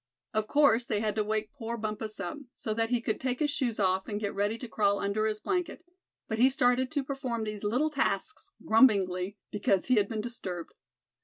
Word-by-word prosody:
Of 215 0 0
course 250 -5 +4
they 210 - 0
had 215 -1 0
to 215 - +3
wake 215 0 -2
poor 235 -4 -5
Bumpus 215 -1 -4
up, 195 +8 -4 0.2
so 215 - -3
that 225 +1 0
he 245 -1 +1
could 220 -2 -2
take 255 -1 -1
his 295 +1 +1
shoes 240 -6 -1
off, 190 -1 +1
and 205 -1 -3
get 205 -2 -2
ready 205 +3 0
to 250 - -7
crawl 200 -2 +2
under 205 +2 0
his 215 -1 -2
blanket; 360 - -2 0.4
but 220 0 -2
he 255 +2 +7
started 255 -2 +2
to 285 -2 0
perform 260 -4 -3
these 215 -1 -5
little 250 +9 +1
tasks 400 +8 -1 0.2
grumblingly, 200 -5 +4
because 195 -2 +1
he 255 -2 +3
had 200 -1 +3
been 220 -2 -2
disturbed. 190 -7 -6
220 Hz, 210 wpm, -29 LUFS, 210-255 Hz, 0.4 s, he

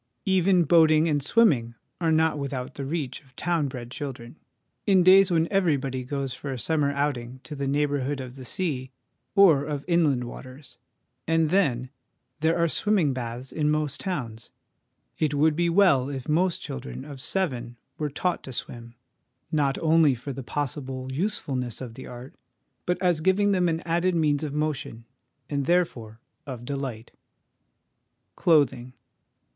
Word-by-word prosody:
Even 190 -1 +3
boating 160 0 +5
and 145 -2 +1
swimming 135 - +3 0.2
are 165 -2 +1
not 160 -1 +2
without 135 -2 -4
the 140 - -5
reach 140 -3 -3
of 130 -3 -26
town 170 -2 0
bred 125 -2 -7
children, 130 -3 -7 0.5
in 190 -3 +5
days 190 +1 +7
when 165 -2 +2
every 180 -7 +3
body 130 -1 -4
goes 135 0 -3
for 140 - -6
a 130 - -4
summer 145 +2 +1
outing 130 -3 -2
to 150 - -8
the 140 -1 -3
neighbourhood 145 -1 0
of 130 -1 -7
the 130 - -9
sea 130 -1 -2 0.5
or 170 -9 +6
of 145 -1 -4
inland 155 -8 +2
waters; 130 +3 -10 0.5
and 165 -1 +2
then, 130 -10 +1 0.5
there 160 +2 +2
are 170 0 +3
swimming 180 -4 +1
baths 125 +1 -5
in 150 -1 0
most 150 -2 0
towns. 120 - -4 0.7
It 150 -2 +1
would 150 +1 +3
be 170 +1 +1
well 165 -8 +4
if 135 -3 -6
most 170 +3 +1
children 65 0 -6
of 140 -3 -9
seven 125 -10 -2 0.2
were 150 -1 -1
taught 175 +5 -1
to 130 - -7
swim, 120 -1 -6 0.6
not 140 -3 +1
only 160 -4 +4
for 135 +4 -6
the 135 - -6
possible 130 -1 -4
usefulness 130 - -2
of 125 -4 -7
the 130 - -10
art, 125 +2 -10 0.5
but 180 - 0
as 175 -4 +2
giving 195 +4 +3
them 180 -3 +2
an 165 0 -1
added 175 +2 0
means 150 -2 +1
of 150 - -3
motion, 150 -6 -3 0.4
and, 140 -2 -2
there 175 +1 +4
fore, 110 -5 -12 0.3
of 125 -3 -7
delight. 130 -5 -5 1.2
Clothing. 135 -6 +2
145 Hz, 160 wpm, -26 LUFS, 130-165 Hz, 1.2 s, days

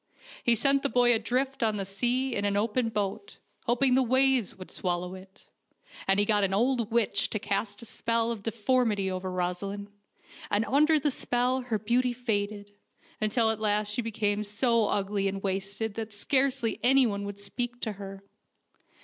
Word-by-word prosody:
He 235 - +4
sent 275 +4 +3
the 280 - 0
boy 245 -1 +4
adrift 255 +4 -1
on 220 -2 +1
the 195 - -2
sea 245 +6 0
in 200 - -1
an 200 0 +1
open 225 +3 0
boat, 210 - -3 0.3
hoping 250 +2 +3
the 260 - +5
waves 260 -2 +3
would 185 -1 -11
swallow 180 0 -2
it; 190 +1 -14 0.6
and 195 +1 +3
he 205 - +3
got 210 -1 +2
an 195 0 +1
old 235 0 +1
witch 225 -3 +2
to - - -2
cast 200 0 -2
the 235 - -10
spell 230 +1 0
of 225 -3 -5
deformity 220 -2 0
over 185 0 -4
Rosaleen, 185 +3 -3 0.6
and 210 +2 +1
under 300 +7 +4
the 295 0 +1
spell 250 +1 0
her 245 -3 -1
beauty 240 +4 +1
faded, 205 -4 -3 0.5
until 220 +1 +2
at 220 - -4
last 210 -1 0
she 240 - -1
became 210 -2 -1
so 225 +1 +1
ugly 200 0 0
and 195 0 -4
wasted 195 +3 -2
that 225 0 -5
scarcely 260 +1 0
anyone 245 -5 +3
would 200 0 -6
speak 240 +4 -4
to 220 - -1
her. 195 -1 -9
220 Hz, 175 wpm, -28 LUFS, 200-245 Hz, 0.6 s, the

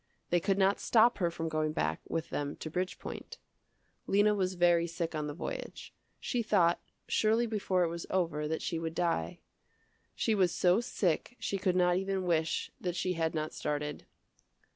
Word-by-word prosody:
They 175 - +4
could 195 +3 +1
not 195 +1 +3
stop 235 0 +4
her 175 -3 +2
from 165 -1 -4
going 155 -1 0
back 80 - -1
with 165 - -3
them 145 0 -2
to 155 - -7
Bridgepoint. 180 +2 -4 0.7
Lena 205 +2 +4
was 185 -2 0
very 175 -1 +4
sick 170 0 -3
on 150 -1 -2
the 145 - -5
voyage. - - -6 0.3
She 245 - -1
thought, 185 -6 +3 0.3
surely 225 +2 +2
before 195 -5 +1
it - - +2
was 170 0 -5
over 165 -5 0
that 160 +1 -2
she 165 - -2
would 165 0 -4
die. 165 - -1 0.7
She 225 - +1
was 185 -4 +3
so 180 +4 +3
sick 200 0 -1
she 195 - -2
could 185 -1 +1
not 180 -1 +4
even 195 0 -1
wish 165 -2 0
that 175 -2 -2
she 185 0 0
had 165 -1 -1
not 155 0 -2
started. 150 0 -3
175 Hz, 180 wpm, -31 LUFS, 160-195 Hz, 0.7 s, They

